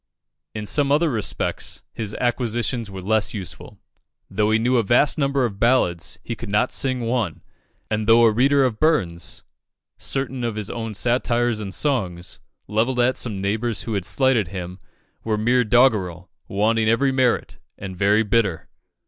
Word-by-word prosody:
In 105 Hz, -1 st, -4 dB
some 140 Hz, +5 st, +3 dB
other 155 Hz, +2 st, +3 dB
respects, 110 Hz, -5 st, -3 dB
his 105 Hz, -2 st, -5 dB
acquisitions 120 Hz, -1 st, -1 dB
were 95 Hz, -2 st, -8 dB
less 110 Hz, +2 st, 0 dB
useful. 95 Hz, -5 st, -8 dB, 0.5 s
Though 105 Hz, +2 st, +1 dB
he 110 Hz, -, +3 dB
knew 125 Hz, +3 st, +2 dB
a 115 Hz, -, +3 dB
vast 120 Hz, +7 st, +3 dB
number 140 Hz, -2 st, +1 dB
of 100 Hz, -4 st, -5 dB
ballads, 115 Hz, -9 st, +1 dB
he 115 Hz, -, -4 dB
could 115 Hz, -1 st, -8 dB
not 105 Hz, +5 st, +1 dB
sing 130 Hz, -2 st, 0 dB
one; 115 Hz, -2 st, -2 dB, 0.4 s
and 110 Hz, -1 st, -2 dB
though 115 Hz, +1 st, +6 dB
a 115 Hz, -, +6 dB
reader 135 Hz, +5 st, +3 dB
of 115 Hz, -4 st, -2 dB
Burns, 90 Hz, -, 0 dB, 0.6 s
certain 135 Hz, -2 st, -3 dB
of 115 Hz, -2 st, -2 dB
his 105 Hz, -2 st, -4 dB
own 115 Hz, -2 st, -5 dB
satires 120 Hz, 0 st, 0 dB
and 100 Hz, -2 st, -5 dB
songs, 95 Hz, -, -2 dB, 0.3 s
levelled 115 Hz, +5 st, 0 dB
at 125 Hz, +1 st, +3 dB
some 105 Hz, -6 st, -4 dB
neighbours 110 Hz, +3 st, -1 dB
who 115 Hz, -, -4 dB
had 100 Hz, -4 st, -2 dB
slighted 130 Hz, -6 st, +2 dB
him, 90 Hz, 0 st, -7 dB, 0.4 s
were 110 Hz, -1 st, -1 dB
mere 120 Hz, +4 st, +2 dB
doggerel, 105 Hz, -7 st, +2 dB, 0.2 s
wanting 110 Hz, +2 st, +1 dB
every 135 Hz, +4 st, +2 dB
merit, 130 Hz, -2 st, 0 dB, 0.2 s
and 95 Hz, -1 st, -7 dB
very 100 Hz, +4 st, +3 dB
bitter. 105 Hz, -5 st, 0 dB
115 Hz, 165 wpm, -22 LUFS, 100-125 Hz, 0.6 s, though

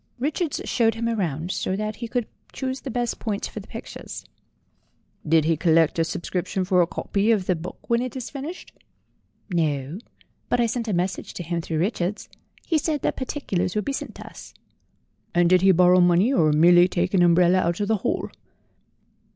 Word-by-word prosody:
Richards 295 Hz, +4 st, -2 dB
showed 225 Hz, -2 st, +2 dB
him 230 Hz, 0 st, -3 dB
round, 175 Hz, -6 st, -2 dB
so 185 Hz, -, -2 dB
that 215 Hz, +1 st, -3 dB
he 235 Hz, -, -5 dB
could 240 Hz, 0 st, -1 dB, 0.3 s
choose 260 Hz, 0 st, -4 dB
the 275 Hz, -, -6 dB
best 240 Hz, -1 st, -2 dB
points 210 Hz, -2 st, -3 dB
for -, -, -7 dB
the -, -, -12 dB
pictures." -, -, -8 dB, 1.0 s
"Did 160 Hz, 0 st, +4 dB
he 165 Hz, 0 st, +2 dB
collect 165 Hz, 0 st, +3 dB
a -, -, +4 dB
subscription 180 Hz, +3 st, -3 dB
for 180 Hz, -1 st, +3 dB
a 170 Hz, -, +2 dB
copy 200 Hz, +4 st, -1 dB
of 210 Hz, -5 st, +2 dB
the 185 Hz, -, +1 dB
book 165 Hz, +2 st, -9 dB
when 235 Hz, 0 st, +2 dB
it 255 Hz, 0 st, -4 dB
is 255 Hz, -3 st, -6 dB
finished 295 Hz, +6 st, -7 dB, 0.4 s
?" -, -, -30 dB
"No, 150 Hz, 0 st, -1 dB, 0.5 s
but 245 Hz, -, +1 dB
I 240 Hz, -, +4 dB
sent 230 Hz, 0 st, -2 dB
a 210 Hz, -, -1 dB
message 180 Hz, +2 st, -2 dB
to 175 Hz, -, -5 dB
him 170 Hz, 0 st, -2 dB
through 160 Hz, -1 st, -3 dB
Richards, 185 Hz, +2 st, -2 dB
and -, -, -25 dB, 0.2 s
he 320 Hz, -3 st, +1 dB
said 300 Hz, -1 st, -2 dB
that -, -, 0 dB
particulars 195 Hz, -10 st, -2 dB
would 210 Hz, -, -1 dB
be 275 Hz, -, -2 dB
sent -, -, -6 dB
us." -, -, -11 dB, 0.8 s
"And 175 Hz, 0 st, +4 dB
did 180 Hz, 0 st, +4 dB
he 190 Hz, 0 st, +6 dB
borrow 180 Hz, 0 st, +5 dB
money 175 Hz, +8 st, +4 dB
or 155 Hz, -, +3 dB
merely 175 Hz, +3 st, +6 dB
take 180 Hz, +1 st, -1 dB
an 190 Hz, -, +4 dB
umbrella 175 Hz, +1 st, +5 dB
out 175 Hz, +1 st, 0 dB
of 205 Hz, -, -1 dB
the 220 Hz, 0 st, +2 dB
hall?" -, -, -2 dB
185 Hz, 200 wpm, -24 LUFS, 175-230 Hz, 1.0 s, he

